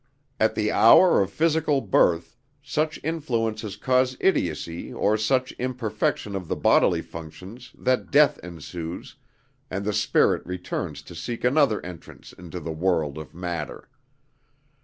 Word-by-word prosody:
At 110 - +2
the 105 -1 0
hour 170 - +6
of 95 - 0
physical 160 -3 +1
birth, 90 -4 +2 0.3
such 155 +2 -1
influences 115 -10 -2
cause 130 0 +1
idiocy 85 - -1
or 105 - +1
such 125 +4 +1
imperfection 110 -5 -2
of 95 -3 -5
the - - -1
bodily - - +3
functions 95 +10 -10
that 130 0 0
death 145 +1 +4
ensues, 85 0 -8 0.5
and 100 +2 -4
the 105 - 0
spirit - - +2
returns 90 -3 -5
to - - -12
seek 115 +8 -6
another 125 - +2
entrance 90 -2 -11
into 90 0 -8
the 80 0 -5
world 80 -3 0
of 80 -1 -11
matter. 85 -3 -5
105 Hz, 135 wpm, -25 LUFS, 85-130 Hz, 0.5 s, hour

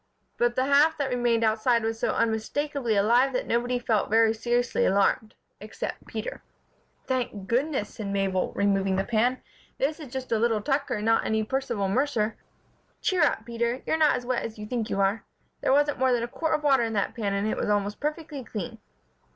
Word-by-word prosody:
But 240 0 +2
the 260 - +1
half 290 +3 +4
that 275 -2 -1
remained 240 -2 +1
outside 225 +2 +2
was 225 0 -2
so - - +1
unmistakably 235 +2 -1
alive 240 +6 +3
that 255 - -1
nobody 245 +2 0
felt 225 -4 0
very 225 +1 +4
seriously 240 +2 0
alarmed 200 +2 +2 0.2
except - - -6
Peter. - - -5 0.6
"Thank 235 -7 -2
goodness!" 255 -2 0
said 215 -4 -6
Mabel, 195 -2 0
removing 195 -1 +1
the 190 - +1
pan, 240 +4 0 0.3
"this 295 +4 -1
is 290 -6 -9
just 260 -1 -5
a 225 - +2
little 225 -1 +2
Tucker 270 +2 -1
and 210 0 -3
not 225 0 +3
any 220 0 0
Percival 235 -4 -1
Mercer! 225 -1 0 0.6
Cheer 370 -2 +1
up, 285 -7 +2
Peter. 235 +2 -2
You're - - +1
not 310 -2 +4
as 245 - -5
wet 250 -1 0
as 220 -1 -6
you 210 - -6
think 230 -1 -3
you 195 - -1
are. 195 +3 +1 0.4
There - - +1
wasn't 290 +1 +2
more 260 0 +3
than 240 -1 +1
a - - -2
quart 320 +6 -1
of 300 - -4
water 275 -3 +4
in 225 -1 -1
that 200 -2 0
pan 205 -4 -2
and 200 +2 0
it - - 0
was - - -1
almost 205 0 0
perfectly 300 -2 -4
clean." 225 0 -6
235 Hz, 200 wpm, -26 LUFS, 215-265 Hz, 0.6 s, half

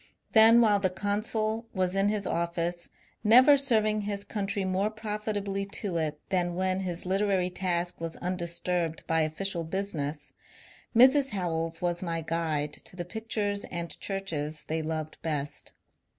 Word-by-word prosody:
Then 225 +1 +7
while 210 -3 +4
the 190 -1 +2
consul 215 +3 -1
was 185 -1 +1
in 195 +1 +3
his 210 -2 -1
office, 170 0 -2 0.3
never 255 +6 +8
serving 215 -6 +3
his 200 -1 -3
country 200 -2 -2
more 190 +2 +1
profitably 210 -2 -3
to 190 -5 -2
it 155 -2 -2
than 175 -2 0
when 185 +1 0
his 180 -2 -2
literary 190 -1 +1
task 175 -2 -1
was 165 -1 -4
undis 175 -1 -3
turbed 170 -3 -1
by 165 0 +2
official 170 +3 -1
business, 160 -5 -4 0.6
Mrs. 265 +3 +6
Howells 165 -2 -2
was 175 -1 0
my 165 -2 -2
guide 155 -2 -1
to - - -9
the 175 -1 -4
pictures 205 0 -2
and 170 -1 -5
churches 160 -6 -4
they 160 +1 -1
loved 155 0 -4
best. 145 -3 -3
185 Hz, 150 wpm, -28 LUFS, 165-205 Hz, 0.6 s, never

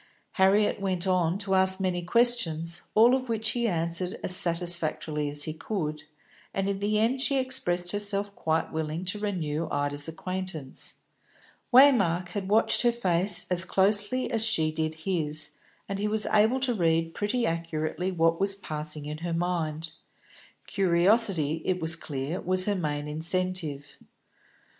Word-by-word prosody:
Harriet 200 +2 +2
went 185 -2 -2
on 180 -2 0
to 200 -1 -2
ask 190 0 +2
many 185 -2 -2
questions, 175 -6 +2
all 230 +3 +5
of 255 -1 -2
which 220 -1 0
he 235 -1 -1
answered 170 0 -1
as 185 - +7
satisfactorily 165 -4 +3
as 145 0 -2
he 155 - -3
could, 155 -4 -5 0.5
and 195 0 -1
in 200 -1 -2
the 210 +1 -1
end 235 +5 0
she 275 0 +3
expressed 180 -10 0
herself 205 0 +1
quite 160 0 -2
willing 160 +2 -4
to 190 +3 -1
renew 165 -6 -3
Ida's 145 +1 -1
acquaintance. 165 -4 -5 0.8
Waymark 200 -10 +4
had 195 -2 -5
watched 220 +2 +3
her 240 - +3
face 190 -4 +1
as 180 0 +3
closely 205 +7 +2
as 225 -2 -1
she 165 -9 +1
did 155 0 -3
his, 155 -5 -1 0.4
and 195 -1 -5
he 210 - -1
was 215 0 -1
able 220 +5 +2
to 255 -2 0
read 165 -4 0
pretty 230 +4 -2
accurately 165 +1 -3
what 165 -1 +1
was 195 0 +4
passing 155 -5 -5
in 150 +1 -6
her 170 0 -4
mind. 165 -2 -3 0.7
Curiosity, 180 -4 +2
it 185 -1 -1
was 165 0 +2
clear, 145 +1 -5
was 185 +1 +1
her 205 - 0
main 150 -5 -3
incentive. 160 -2 -3
180 Hz, 150 wpm, -26 LUFS, 160-205 Hz, 0.8 s, as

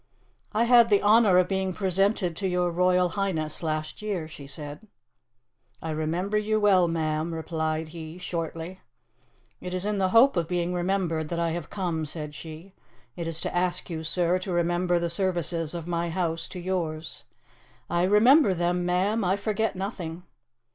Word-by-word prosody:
"I 220 +1 +2
had 235 -1 +6
the 205 -1 +3
honour 210 -3 +5
of 180 -1 +4
being 190 -1 -1
presented 190 -1 +1
to 195 - -1
your 180 -1 0
Royal 180 +1 +3
Highness 170 -5 -2
last 155 0 -3
year," 195 -7 -3
she 145 -3 -11
said. 145 +6 -6 0.9
"I 160 - -4
remember 170 +7 -1
you 215 +1 0
well, 190 -4 +4
ma'am," 160 0 -1
replied 160 -1 -2
he 160 0 -8
shortly. 170 0 -5 0.8
"It 180 0 -5
is 185 +1 -2
in 210 -1 -1
the 190 -1 +2
hope 235 +7 +6
of 170 -3 0
being 175 0 -1
remembered 175 -3 -1
that 170 - -2
I 170 -1 0
have 170 -2 -5
come," 170 -6 -2
said 150 -1 -5
she. 160 +5 -10 0.4
"It 170 -1 -4
is 165 -1 -1
to - - -3
ask 180 0 0
you, 160 -1 -4
Sir, 175 +2 +2
to 185 +1 -5
remember 175 +1 +1
the 170 0 0
services 170 -2 -1
of 170 -1 -6
my 170 0 -1
house 165 -1 -2
to 180 - -8
yours." 170 -4 -3 0.6
"I 175 - 0
remember 210 - +5
them, 175 +1 0
ma'am; 190 +5 +1
I 190 +2 +1
forget 215 +1 -1
nothing." 180 -3 -5
175 Hz, 170 wpm, -26 LUFS, 165-190 Hz, 0.9 s, had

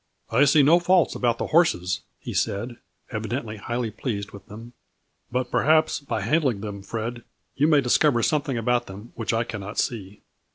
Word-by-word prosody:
" - - -49
I 135 +6 +5
see 145 +1 +5
no 165 +5 +6
faults 180 0 +3
about 120 -2 0
the - - -2
horses," 105 - +2 0.2
he - - -7
said, 115 +4 -2 0.3
evidently 110 0 -4
highly 120 +2 -3
pleased 105 -3 -4
with 100 -1 -13
them; 115 +3 -11 0.3
" - - -46
but 125 0 -2
per - - +2
haps, 155 +1 +3
by 115 -6 -3
handling 130 -2 +1
them, 100 -2 -6
Fred, 115 +3 -5 0.3
you 145 +2 +3
may 150 -3 +5
discover 125 -1 +3
something 145 -2 0
about 120 +1 0
them 100 +5 -10
which 115 -1 -3
I 115 0 +1
cannot 105 -3 -7
see." 105 -5 -3
120 Hz, 190 wpm, -24 LUFS, 105-140 Hz, 0.3 s, no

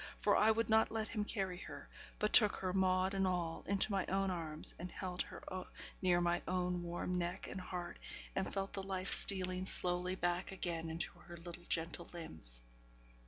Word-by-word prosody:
for - - +3
I 215 - +5
would 225 +1 +2
not 220 0 +4
let 220 -1 -2
him 210 -2 -2
carry 195 -4 -2
her; - - -9 0.3
but 210 - -1
took 210 -3 +10
her, 185 -1 -3
maud 185 0 +2
and 195 -1 +1
all, 175 -3 -2
into 200 +2 +3
my 195 -2 +1
own 195 0 0
arms, 160 -3 -1
and 180 +1 -6
held 180 -1 -4
her - - -8 0.6
near 180 -2 +3
my 175 0 +1
own 180 -1 -1
warm 175 +1 -3
neck 175 0 -3
and 190 - -6
heart, 180 -1 -6 0.4
and 190 - -1
felt 195 0 -3
the 195 - -3
life 190 -1 -3
stealing 185 -1 +4
slowly 180 0 +2
back 175 0 -1
again 170 -3 -4
into 160 +1 -2
her 175 - -11
little 175 +1 -9
gentle 170 +1 -1
limbs. 80 - -1
180 Hz, 185 wpm, -36 LUFS, 175-195 Hz, 0.6 s, took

